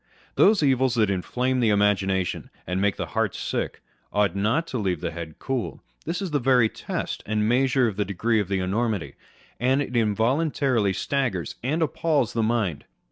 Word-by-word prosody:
Those 205 -6 +4
evils 130 -2 +3
that 110 -4 +2
inflame 125 +8 -1
the 115 -3 +3
imagination 95 -3 +1 0.2
and 90 +2 -1
make 100 -2 +2
the - - -3
heart - - 0
sick, - - -3 0.3
ought 105 -3 +1
not 110 +12 +1
to 125 - -2
leave 95 -5 -1
the - - -3
head 80 -2 -7
cool. 130 -3 -3 0.3
This 175 +5 -2
is 185 - -4
the 145 - +1
very 125 -3 +4
test - - -4
and 105 0 +1
measure 130 +1 +3
of 105 -3 -4
the 105 - +2
degree 110 +4 0
of 100 - -1
the 100 0 0
enormity, 95 - -1 0.5
that 130 +3 +2
it 130 -3 -3
involuntarily 115 0 +1
staggers 105 - -1
and 150 +7 0
appals 150 -4 0
the 115 - 0
mind. 110 -8 0
115 Hz, 180 wpm, -25 LUFS, 100-130 Hz, 0.5 s, Those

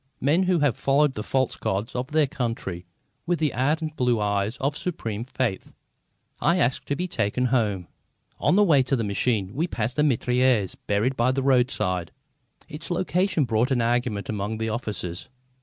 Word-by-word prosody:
Men 150 +7 +3
who 180 -3 +2
have 145 -5 +2
followed 140 +1 +2
the 105 - -4
false 130 +4 0
gods 100 +4 -2
of 125 +1 -2
their 155 +1 +3
country 115 -9 -4 0.4
with 175 0 +2
the 155 -2 0
ardent 155 +5 0
blue 125 -4 +1
eyes 105 +2 0
of 140 +3 -1
supreme 115 - -4
faith. 125 -5 -3 0.7
I 170 - +3
asked 125 -6 0
to 145 - 0
be 180 +5 -2
taken 125 - 0
home. 105 -8 0 0.5
On - - +3
the 210 - +6
way 155 -8 +5
to 130 +1 0
the 115 - -1
machine 100 -1 0
we 160 +6 0
passed 125 -4 -3
a - - +5
mitrailleuse 125 -5 +2
buried 105 +6 +1
by 125 +2 +2
the 135 0 -1
roadside. 120 -10 +1 0.6
Its 150 +2 -8
location 175 -2 +1
brought 115 +2 +1
an 125 -3 +1
argument 120 -3 0
among 105 +1 -3
the 110 0 -2
officers. 105 -5 -4
125 Hz, 175 wpm, -25 LUFS, 110-145 Hz, 0.7 s, the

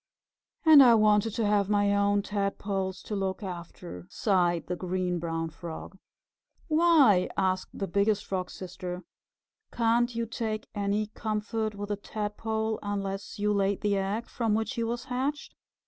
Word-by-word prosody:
"And 310 -3 +10
I 240 -3 +8
wanted 215 0 +4
to 225 - 0
have 205 -1 +2
my 205 -1 +3
own 200 0 +2
Tadpoles 200 -2 -2
to 210 - -4
look 195 +1 -2
after," 170 - -8
sighed 175 - +1
the 180 - -3
Green 180 -1 -2
Brown 165 -1 -3
Frog. 170 +2 -8 0.7
"Why?" 310 - +5
asked 185 -1 0
the 195 - -1
Biggest 200 +3 +1
Frog's 185 -2 -3
Sister. 180 0 -6 0.7
"Can't 235 +1 +2
you 230 0 -1
take 220 -1 -4
any 205 +1 0
comfort 215 0 -3
with 205 +1 -5
a 205 - -1
Tadpole 220 +1 -3
unless 200 -1 -4
you 210 0 +1
laid 200 -1 +1
the 205 -1 +1
egg 200 +4 -2
from 225 -3 0
which 220 +4 -1
he 235 -3 -2
was 235 +1 -2
hatched? 265 +4 -3
205 Hz, 150 wpm, -28 LUFS, 190-220 Hz, 0.7 s, And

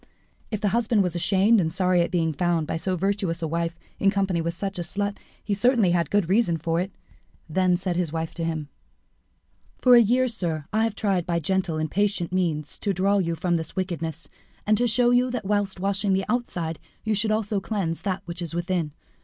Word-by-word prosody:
If 215 -2 -3
the 205 - +2
husband 225 -1 +2
was 180 -2 -2
ashamed 195 +5 +4
and 160 -2 -1
sorry 180 0 +2
at 170 - 0
being 165 -3 0
found 170 0 0
by - - -3
so 185 +3 -1
virtuous 190 -2 -1
a - - 0
wife 170 +1 -2 0.2
in 195 - +4
company 195 -4 0
with 170 +1 -2
such 195 0 -4
a - - 0
slut, 200 +3 -2 0.3
he 205 - -1
certainly 215 -2 +3
had 170 -3 +1
good 205 -4 +2
reason 190 -3 +2
for 165 +1 -1
it. 190 +2 -4 0.6
Then 180 +2 +2
said 180 -1 -2
his 175 -4 -1
wife 160 0 -3
to 170 - -4
him 160 -3 -3 1.1
"For 250 - +5
a 240 - +9
year, 250 +4 +3
sir, 170 - -3
have 220 +1 +3
I - - +1
tried 200 -4 -1
by 170 -1 +1
gentle 185 0 0
and 155 0 -2
patient 200 -4 0
means 160 -5 -1
to 200 - 0
draw 200 +3 +2
you 170 -3 0
from 175 +1 0
this 160 -1 -5
wickedness, 165 -4 -3 0.4
and 215 - +4
to 245 - +3
show 240 +2 +3
you 250 +1 +3
that 250 -4 -4
whilst 205 -2 0
washing 195 +1 +1
the 190 0 +1
outside 180 -9 -2 0.2
you 220 - 0
should 215 +1 0
also 215 -1 0
cleanse 190 -5 -2
that 195 -1 -2
which 175 0 -5
is 170 -1 -4
within. 175 -3 -1
185 Hz, 215 wpm, -25 LUFS, 170-205 Hz, 1.1 s, a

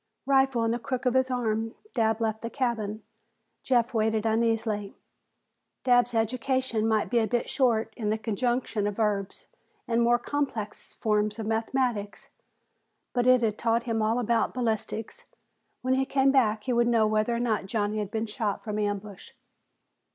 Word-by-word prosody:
Rifle 265 -3 +3
in 225 - +1
the 240 - -1
crook 255 +2 -4
of 250 - +3
his 260 0 +2
arm, 225 -2 -1 0.2
Dabb 225 -2 +1
left 220 -1 -1
the 230 - -4
cabin. 225 -5 -2 0.6
Jeff 245 -1 +1
waited 220 -1 +1
uneasily. 225 -2 0 0.9
Dabb's 245 -1 +3
education 235 0 0
might 220 0 +1
be 240 - +4
a 220 - +1
bit 240 0 -1
short 230 -5 +1
in 215 -3 -2
the 215 - +1
conjugation 230 -1 -1
of 205 - -3
verbs 205 -3 -1 0.4
and 230 0 +1
the - - +4
more 240 +1 +4
complex 240 -5 -4
forms 210 -1 0
of 220 - -4
mathematics, 225 -1 -2 0.8
but 245 -1 +1
it 255 -1 +5
had 215 -2 0
taught 230 0 +1
him 230 -3 -1
all 220 +2 +1
about 235 -1 +1
ballistics. 225 -2 -3 0.6
When 255 +1 +2
he 265 0 +2
came 270 0 +3
back 220 -6 +2
he 255 - -1
would 235 0 +3
know 230 -2 +3
whether 215 +2 +1
or - - -1
not 220 -5 0
Johnny 210 0 -1
had 205 -2 -3
been 220 +1 -2
shot 210 -1 -3
from 210 -2 -3
ambush. 205 -1 -4
225 Hz, 170 wpm, -27 LUFS, 215-245 Hz, 0.9 s, it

